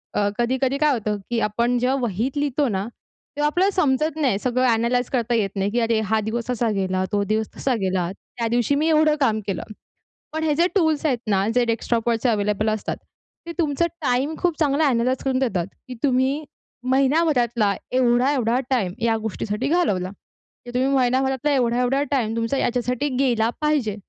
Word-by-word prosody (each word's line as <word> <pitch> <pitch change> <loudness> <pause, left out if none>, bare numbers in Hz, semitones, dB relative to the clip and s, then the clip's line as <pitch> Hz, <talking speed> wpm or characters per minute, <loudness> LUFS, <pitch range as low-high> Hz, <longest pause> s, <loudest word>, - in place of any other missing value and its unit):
अ, 205 -1 +2
कधी-कधी 260 +3 +1
काय 300 -1 +3
होतं 210 -3 -2
की 235 -1 0
आपण 235 +3 0
जेव्हा 255 +2 +1
वहीत 240 +5 -2
लिहितो 285 -1 +1
ना, 195 -1 -1
तेव्हा 295 +4 -7
आपल्याला 370 +6 +2
समजत 305 -1 +1
नाही. 230 -8 +2
सगळं 255 +1 0
ॲनलाइज 235 +2 +1
करता 240 -1 +1
येत 200 -3 -1
नाही 195 +1 -1
की 240 - +1
"अरे, 230 -1 +1
हा 220 - +3
दिवस 235 +2 -3
असा 235 -1 0
गेला, 185 0 0
तो 205 -1 +1
दिवस 220 0 +1
तसा 260 -3 0
गेला. 185 -1 0 0.3
त्या 230 -1 0
दिवशी 240 +4 +1
मी 310 +3 +1
एवढं 310 -1 +4
काम 220 -5 +2
केलं." 195 - -2 0.7
पण 315 0 -2
हे 300 -2 +2
जे 340 +3 +3
टूल्स 315 -5 +2
आहेत 255 -5 +1
ना, 195 0 +2
जे 245 -1 +3
डेस्कटॉपवरचे 230 +1 0
अव्हेलेबल 210 0 0
असतात 215 -1 -3 0.5
ते 335 - -5
तुमचं 320 +1 +1 0.2
टाईम 270 +4 0
खूप 345 -4 0
चांगला 295 0 +2
ॲनलाइज 250 +1 0
करून 260 -1 +1
देतात 195 -10 0 0.2
की 250 - -6
तुम्ही 270 +2 +1 0.5
महिनाभरातला 260 -7 +2 0.2
एवढा-एवढा 250 -1 +2
टाईम 205 -9 +1
या 225 -1 +2
गोष्टीसाठी 220 +4 -3
घालवला. 205 - +1 0.6
की 240 - -8
तुम्ही 260 +2 +2
महिनाभरातला 265 +2 +1
एवढा-एवढा 250 +2 +1
टाईम 230 -5 0
तुमचा 230 +4 -1
याच्यासाठी 250 +3 0
गेला 240 -4 +2
पाहिजे. 295 -9 +1
245 Hz, 175 wpm, -22 LUFS, 225-280 Hz, 0.7 s, एवढं